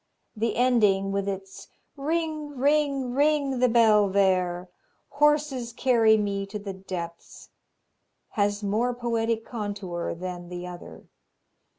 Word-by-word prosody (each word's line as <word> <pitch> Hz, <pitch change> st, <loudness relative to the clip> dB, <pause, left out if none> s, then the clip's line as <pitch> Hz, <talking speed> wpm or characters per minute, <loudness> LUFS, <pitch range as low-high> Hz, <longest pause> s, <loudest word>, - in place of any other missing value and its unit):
The 225 Hz, 0 st, -1 dB
ending, 210 Hz, -6 st, +3 dB
with 200 Hz, 0 st, -1 dB
its 195 Hz, -1 st, -6 dB, 0.3 s
"Ring, 305 Hz, -1 st, -3 dB
ring, 280 Hz, -2 st, +1 dB
ring 285 Hz, -2 st, +2 dB
the 250 Hz, 0 st, +4 dB
bell 215 Hz, -3 st, +5 dB
there! 185 Hz, -2 st, +1 dB, 0.4 s
Horses 290 Hz, -4 st, +1 dB
carry 230 Hz, -2 st, +4 dB
me 200 Hz, -1 st, -2 dB
to 205 Hz, +2 st, -5 dB
the 200 Hz, -1 st, -6 dB
depths," 180 Hz, -3 st, -8 dB, 0.8 s
has 205 Hz, 0 st, 0 dB
more 225 Hz, +5 st, 0 dB
poetic 230 Hz, -2 st, -1 dB
contour 200 Hz, -7 st, -4 dB
than 175 Hz, 0 st, -6 dB
the 180 Hz, 0 st, -6 dB
other. 180 Hz, -1 st, -10 dB
220 Hz, 115 wpm, -26 LUFS, 195-255 Hz, 0.8 s, bell